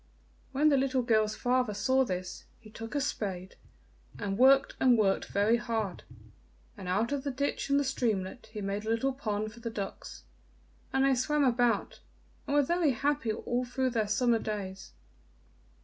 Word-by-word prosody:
When 290 +3 +3
the 280 - +4
little 265 -1 +1
girl's 215 -2 +2
father 250 -3 0
saw 260 +6 +2
this, 185 -5 -5
he 215 -2 -15
took 225 +5 -8
a 285 - +1
spade, 190 -8 -3 0.6
and 200 -2 -3
worked 270 +4 +5
and 250 -2 +5
worked 195 -3 +2
very 205 +4 +2
hard, 225 -5 -3 0.7
and 195 -4 -9
out 210 +7 0
of 285 -2 -2
the 285 - -2
ditch 280 +1 -2
and 280 0 +4
the - - +1
streamlet 220 -4 -2
he 215 -1 -6
made 200 +1 -3
a 220 - -4
little 230 +4 +1
pond 215 -5 -3
for 235 - -13
the 230 0 -4
ducks, 200 -3 -7 0.7
and 265 0 +2
they 275 - +4
swam 290 +4 +1
about 240 -4 +1 0.5
and 285 - 0
were 290 - +5
very 335 -1 +2
happy 280 -2 0
all 240 +3 -2
through 255 +1 -1
the 220 -3 0
summer 230 +2 +2
days. 195 -3 -5
235 Hz, 175 wpm, -30 LUFS, 210-265 Hz, 0.7 s, worked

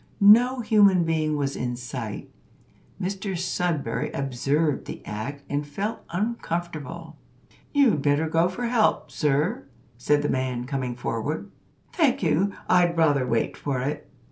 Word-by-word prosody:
No 245 +5 +6
human 205 -5 +5
being 155 -2 0
was 140 -1 -1
in 125 -1 -2
sight. 120 -3 -6 0.7
Mr 195 0 -3
Sudberry 175 -3 -1
observed 140 +3 0
the - - -8
act, 135 +7 -5
and 145 +1 -1
felt 200 +10 -4
uncomfortable. 170 - -4 0.5
"You'd 265 - +3
better 145 +3 +2
go 165 +2 +2
for 240 +7 -4
help, 235 -2 +1
sir," 150 +1 0 0.3
said 145 +3 +2
the - - +1
man, 130 -2 -1
coming 130 -2 -3
forward. 140 - -3 0.4
"Thank 275 - +2
you, 170 +5 +2 0.2
I'd 175 -2 +3
rather 145 -5 +3
wait 115 -1 0
for 140 -3 -2
it." 145 +3 -4
155 Hz, 135 wpm, -25 LUFS, 140-190 Hz, 0.7 s, No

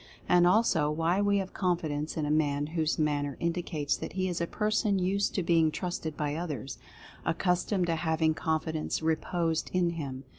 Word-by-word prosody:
And 175 0 +5
also, 180 -6 +3
why 165 +5 +1
we 205 0 +3
have 190 -1 -3
confidence 160 -5 -1
in 155 - 0
a 150 - -1
man 145 -2 +1
whose 160 -2 0
manner 145 -2 0
indicates 165 -4 -1
that - - -6
he 185 0 0
is 175 -2 -2
a 170 - 0
person 210 0 +1
used 195 +2 0
to 190 - 0
being 165 -2 +4
trusted 160 -2 -4
by 145 -1 -1
others 150 -6 -5 0.2
— - - -16 0.2
accustomed 180 +2 +1
to 165 -1 0
having 160 -1 +1
con 160 0 0
fidence 160 0 -3
reposed 165 0 0
in 175 -2 +2
him. 135 -5 -5
165 Hz, 185 wpm, -29 LUFS, 155-180 Hz, 0.2 s, And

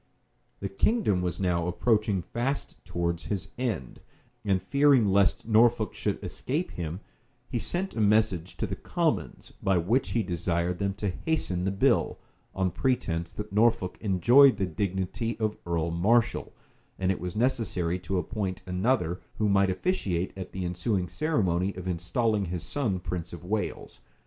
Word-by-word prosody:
[*] - - -43
The 100 - -1
king 100 - +1
was 90 -2 -2
now 90 -3 +1
approaching 105 0 +1
fast 125 - -3
towards 85 -1 -2
his 100 -4 -3
end; 110 - -3 0.4
and 100 -3 +2
fearing 140 0 +4
lest 100 +1 +2
Norfolk 115 0 +4
should - - -2
escape 155 +7 -3
him, 85 +2 -5 0.5
he 120 - -2
sent 185 - -3
a 110 - 0
message 105 -5 +2
to - - -1
the - - -4
commons, - - -2
by 95 -1 +2
which 110 +10 +1
he 115 - +2
desired 85 -1 -1
them 100 -1 -1
to 100 0 -2
hasten 95 - -1
the - - +2
bill, 95 - +2 0.4
on 95 -1 +1
pretence 85 -8 -1
that 105 -1 -6
Norfolk 110 -3 +2
enjoyed 120 +6 +6
the 95 - +1
dignity 95 +5 -2
of 110 -1 0
earl 85 -1 0
marshal, 115 +8 +2 0.5
and 95 0 +1
it 95 - -2
was 90 +2 -5
necessary 105 -8 0
to 95 +1 -2
appoint 95 +1 -3
another, 90 -2 0 0.2
who 105 - +1
might 100 -1 +4
officiate 95 - -1
at 95 -1 -7
the 95 -1 -4
ensuing 90 +1 -1
ceremony 95 - 0
of 95 0 -6
installing 100 +4 0
his 85 -1 -4
son 115 -11 -1
prince 85 -1 -5
of 85 0 -9
Wales. 105 +2 -3
95 Hz, 160 wpm, -28 LUFS, 90-115 Hz, 0.5 s, enjoyed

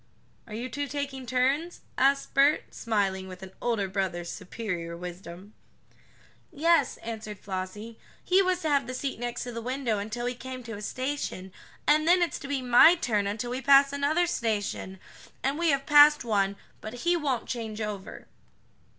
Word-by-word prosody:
"Are 215 - -7
you 240 +3 -4
two 285 +3 -4
taking 275 -2 -5
turns?" 270 +8 0
asked 275 +1 +2
Bert, 280 +2 +3
smiling 195 -4 -1
with 185 0 -10
an 190 - -9
older 225 -5 0
brother's 185 -3 -2
superior 180 -4 -5
wisdom. 180 +3 -9 1.0
"Yes," 325 -2 +2
answered 220 -2 -6
Flossie, 200 +4 -6 0.2
"he 370 +2 +4
was 370 -1 0
to 315 - 0
have 280 -1 +2
the 255 - -4
seat 270 -2 -3
next 240 0 -3
to 245 - -6
the 230 0 -5
window 250 -3 -1
until 220 +4 -4
we 245 - -1
came 255 0 -8
to 225 -2 -7
a 205 - -8
station, 255 -6 -4 0.3
and 305 +1 +3
then 355 +1 +5
it's 340 - -2
to 280 - -8
be 275 -2 -2
my 250 +8 +7
turn 215 - 0
until 220 +4 -3
we 255 +2 -3
pass 275 +1 +6
another 295 +5 +2
station, 210 - -2 0.4
and 275 +4 0
we 340 -1 +2
have 275 -1 +1
passed 295 0 +7
one, 200 -3 +1 0.3
but 215 - -7
he 350 0 +4
won't 280 -7 -1
change 225 -3 -4
over." 210 -3 -6
245 Hz, 175 wpm, -28 LUFS, 205-280 Hz, 1.0 s, my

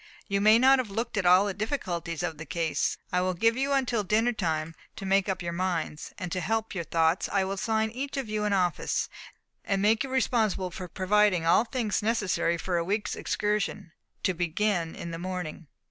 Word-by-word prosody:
"You 200 -1 0
may 215 +2 +7
not 265 +2 +6
have 245 -5 -2
looked 225 +4 -3
at 195 -4 +1
all 180 +3 +6
the 200 - -1
difficulties 180 - -3
of 165 -3 -3
the 160 - -6
case. 165 0 -1 0.2
I 180 - +3
will 185 0 0
give 225 +6 +3
you 270 +2 0
until 250 -5 +1
dinner 220 +5 +2
time 160 -6 -2 0.2
to 195 - -7
make 195 0 +2
up 190 -2 -2
your 170 0 -3
minds; 170 -4 -2
and 180 -4 -5
to 185 - -1
help 225 +2 -1
your 170 -4 -3
thoughts, 165 +2 +1
I 195 -1 +2
will 190 - -3
assign 220 +2 0
to 225 - -15
each 275 +2 -4
of 270 -4 -2
you 215 0 -2
an 210 - 0
office, 180 -3 0 0.5
and 195 -1 0
make 215 +4 +3
you 270 - -5
responsible 220 -8 +1
for 180 +1 -7
providing 185 0 +2
all 175 +7 +4
things 225 -5 -1
necessary 205 -6 +1
for 175 +1 -1
a 170 - +1
week's 200 +2 -1
excursion, 210 -5 -2 0.3
to 185 - +2
begin 175 0 -1
in 170 - -6
the 165 - -5
morning. 180 -3 -5
195 Hz, 210 wpm, -28 LUFS, 175-220 Hz, 0.5 s, may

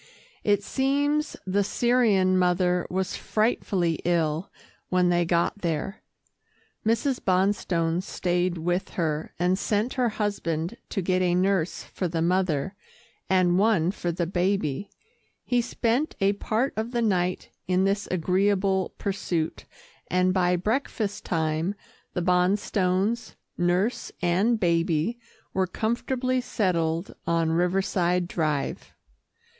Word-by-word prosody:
It 205 -1 +2
seems 285 +4 0
the 195 +2 +1
Syrian 210 -5 +3
mother 180 -1 +2
was 185 +1 -2
frightfully 195 -6 0
ill 165 0 0 0.4
when 180 -1 +3
they 175 0 +2
got 170 +4 +1
there. 170 +3 -3 0.8
Mrs. 245 +4 +1
Bonstone 180 -3 +1
stayed 180 -1 -1
with 175 +3 -1
her, 155 -2 -1
and 180 +2 +1
sent 215 +5 0
her 250 -3 +1
husband 200 -4 -2
to 195 - -2
get 185 +1 +1
a 175 -1 +2
nurse 185 -2 +1
for 185 - -3
the 165 -1 -1
mother, 180 -1 +1 0.6
and 185 -1 +3
one 195 -5 +3
for 175 -3 -3
the 170 +1 -1
baby. 180 -1 -1 0.6
He 245 -1 +2
spent 245 +4 0
a 195 +1 +3
part 225 +6 -1
of 220 +3 -3
the 240 -1 +1
night 180 -4 0 0.2
in 185 +1 +2
this 200 +1 0
agreeable 190 +2 +1
pursuit, 180 -5 -2 0.4
and 185 0 +2
by 180 -1 +2
breakfast 215 +1 -2
time 160 +3 0 0.4
the 180 - 0
Bonstones, 185 +4 +1 0.2
nurse 180 +7 0
and 195 +7 +2
baby 170 +4 +1 0.3
were 190 -1 +1
comfortably 250 +5 -1
settled 170 -6 -1
on 165 -1 +2
Riverside 180 0 +1
Drive. 155 -5 -2
185 Hz, 120 wpm, -26 LUFS, 175-205 Hz, 0.8 s, Syrian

